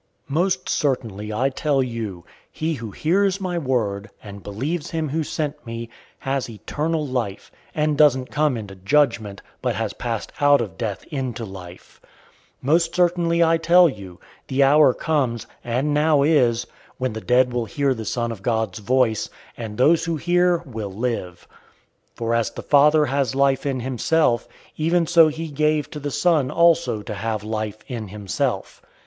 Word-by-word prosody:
005:024 - - -5
"Most 185 +3 +1
certainly 110 -7 -1
I 125 +6 +1
tell 135 0 0
you, 110 -8 -5 0.3
he 160 +1 -2
who 115 -6 -6
hears 190 - +1
my 180 -3 -2
word, 110 -8 -1
and 100 -1 -9
believes 145 - -4
him 160 -2 -2
who 160 +3 -1
sent 150 0 -4
me, 115 -1 -7 0.3
has 135 -2 -2
eternal 150 - -2
life, 120 -7 -4 0.2
and 150 -1 +1
doesn't 130 -4 +4
come 150 -4 +1
into 105 -3 -7
judgment, 105 0 0 0.2
but 125 -3 -1
has 110 0 -2
passed 115 -3 -4
out 145 0 +6
of 105 -8 -4
death 100 -1 -4
into 130 -5 -3
life. 90 -3 -11
005:025 - - -26 0.5
Most 165 +4 +2
certainly, 175 -1 +2
I 165 0 +4
tell 175 +2 +6
you, 95 - -8 0.3
the 135 +1 +2
hour 145 0 +6
comes, 130 -8 -1 0.2
and 130 +5 -1
now 150 -1 +3
is, 125 -6 +3 0.3
when 130 -3 -2
the 110 - -5
dead 125 +1 +3
will 120 -1 -1
hear 140 +5 0
the 115 -3 -6
Son 120 +2 -2
of 110 -4 -8
God's 110 -3 -1
voice; 120 0 +1 0.3
and 110 -3 -7
those 155 +6 +4
who 165 0 -1
hear 175 +2 +2
will 110 -7 -6
live. 95 -5 -4 0.7
005:026 - - -46
For 115 0 -2
as 115 -1 +1
the - - -9
Father 150 +1 +5
has 135 -2 -1
life 140 +1 +2
in 130 -2 -1
himself, 130 +1 +1 0.3
even 165 +2 +1
so 165 -1 +6
he 160 +1 -4
gave 150 0 0
to 150 - -6
the 145 0 -3
Son 155 -3 +2
also 170 -10 +3
to 105 - -6
have 110 0 -3
life 110 -1 -4
in 115 -6 -5
himself. 100 -1 -3
130 Hz, 170 wpm, -22 LUFS, 110-155 Hz, 0.7 s, out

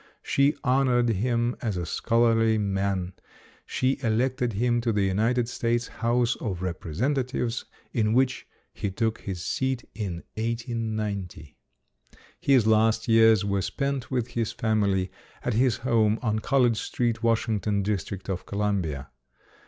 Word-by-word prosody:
She 140 +2 +2
honored 125 -3 +3
him 120 +3 0
as 110 -6 -2
a 85 - -2
scholar 115 +6 +2
ly 115 -1 +3
man. 95 -2 -1 0.5
She 130 +1 0
elected 125 +1 0
him 120 +3 +1
to 115 -1 0
the 105 -2 +1
United 115 +5 +1
States 120 0 -1
House 120 +1 +1
of 95 -5 -4
Representatives, 120 - -2 0.3
in 110 -2 +1
which 130 +1 +1 0.3
he 100 - -3
took 110 +3 -1
his 95 -3 -5
seat 130 -2 -2
in 95 -6 -4
1890. 110 - -3 0.8
His 130 -5 +4
last 110 +1 +3
years 110 -3 +5
were 100 -1 0
spent 140 +3 -2
with 125 -3 -1
his 115 -2 -2
family 100 -4 0 0.3
at 125 - +1
his 120 +1 +2
home 110 -3 +2
on 110 -2 +1
College 125 -2 +2
Street, 115 -2 -1
Washington, 110 -3 +1
District 100 -1 -3
of 95 -3 -4
Columbia. 95 -9 -2
115 Hz, 135 wpm, -26 LUFS, 100-120 Hz, 0.8 s, years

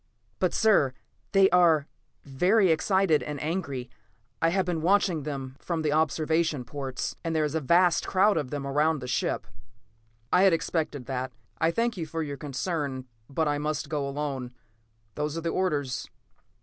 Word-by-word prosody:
"But, 185 -2 +2
sir, 195 -12 +4 0.4
they 195 -1 +6
are 165 -5 +5 0.4
very 180 +8 +3
excited 185 -1 +2
and 150 -1 -5
angry; 145 -6 -3 0.5
I 165 - +4
have 190 +2 +1
been 175 -3 -1
watching 180 -2 +2
them 135 -3 -5
from 165 -3 -3
the 150 - +1
observation 155 -1 +1
ports. 135 0 -4
And 165 -1 -2
there 155 -1 +2
is 150 - -3
a 160 - 0
vast 175 +5 +3
crowd 200 +2 +4
of 140 - -1
them 145 -1 -4
around 150 +3 +2
the 125 -3 -7
ship." 125 - -1 0.9
"I 180 - +6
had 195 -2 +6
expected 155 -5 -1
that. 130 0 -3 0.3
I 160 - +3
thank 230 +5 0
you 165 -3 -3
for 165 +1 -3
your 145 -2 -5
concern, 140 -2 -3 0.2
but 155 +3 0
I 145 0 0
must 150 0 -2
go 145 -3 -2
alone. 135 -4 -4 0.6
Those 150 +1 -3
are - - -2
the 165 - -1
orders. 145 -9 -1
155 Hz, 170 wpm, -27 LUFS, 140-175 Hz, 0.9 s, they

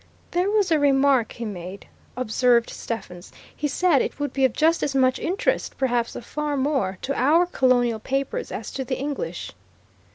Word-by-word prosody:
"There 360 +3 +1
was 410 -4 +2
a 315 - +4
remark 275 -4 +3
he 235 - -6
made," 190 -1 -7 0.3
observed 245 0 +2
Stephens. 190 -6 -7 0.2
"He 300 - -1
said 305 0 +2
it - - -4
would 290 0 -2
be 270 -1 +3
of 255 - +1
just 325 +2 +2
as 275 - -1
much 260 -1 +3
interest, 365 +5 -1
perhaps 240 -3 0
of 235 - -7
far 295 +1 -2
more, 265 -9 0
to 275 - -1
our 305 +7 +4
Colonial 245 -8 +2
papers 275 - -3
as - - -5
to 270 - -3
the 255 0 -3
English." 265 - -4
270 Hz, 175 wpm, -24 LUFS, 235-295 Hz, 0.3 s, a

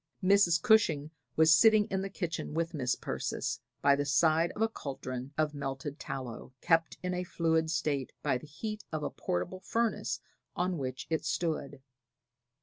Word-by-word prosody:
Mrs. 185 -3 +5
Cushing 165 -11 +3 0.2
was 160 0 +6
sitting 215 +5 +6
in 190 0 0
the 195 - -3
kitchen 170 -5 -4
with 165 +1 -1
Mis' 130 -5 0
Persis, - - -3 0.2
by 140 0 +6
the 145 - 0
side 155 +4 +3
of 220 - +1
a - - +4
caldron 130 - -6
of 155 -1 +1
melted 140 +1 -5
tallow, 130 -1 -6
kept 165 +3 +2
in 180 0 -1
a 180 0 -1
fluid 160 -2 +1
state 145 -4 -1
by 125 - +1
the 155 - -13
heat 215 +8 -5
of 155 -2 -3
a - - -2
portable 90 - -3
furnace 230 +4 -1 0.4
on 180 -2 0
which 130 -1 -4
it 160 - 0
stood. 145 -5 -2
160 Hz, 165 wpm, -31 LUFS, 140-180 Hz, 0.4 s, was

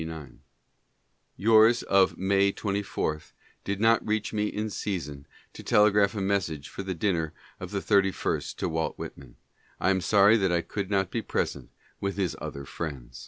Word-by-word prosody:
Y 110 +3 +6 0.2
of 95 -1 +4
May 100 +1 +2
24th 100 -7 -3 0.3
did 100 0 -3
not 115 +1 +4
reach 110 0 -1
me 105 -1 0
in 105 +1 -3
season 75 -10 -4 0.3
to - - -10
telegraph 105 0 +3
a 100 - -2
iage 90 -7 -1
for - - -6
the 95 -1 -4
dinner 80 -3 -1 0.3
of 90 - -6
the 100 0 -3
31st 95 -2 0
to - - -2
Walt 80 0 -2
Whitman. 65 -3 -9 0.4
I 90 - +2
am 95 -1 +1
sorry 100 +3 +5
that 95 -4 +1
I 85 -1 +2
could 95 +3 -5
not 95 -3 0
be - - -1
present - - -3 0.3
wich 100 -1 -2
his 95 -3 -1
other 70 0 -6
friends. 65 -7 -7
95 Hz, 165 wpm, -27 LUFS, 85-105 Hz, 0.4 s, Y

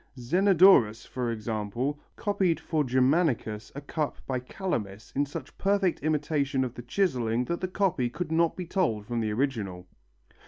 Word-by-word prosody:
Zenodorus, 165 - +5
for 125 -2 -3
example, 115 +5 -3 0.2
copied 195 -5 +1
for 155 -2 0
Germanicus 130 -5 +1
a 140 - -5
cup 150 +1 -3
by 130 -2 -1
Calamis 115 - -4
in 140 +1 +1
such 140 - -8
perfect 195 -3 +2
imitation 145 -3 0
of 125 -2 -3
the 120 - -8
chiselling 125 - 0
that 170 +4 -3
the 185 - 0
copy 185 -10 0
could 160 +6 -5
not 165 0 +2
be 180 - -4
told 165 - 0
from 120 +1 -2
the 110 -2 -1
original. 105 -7 -2
135 Hz, 155 wpm, -28 LUFS, 115-170 Hz, 0.2 s, Zenodorus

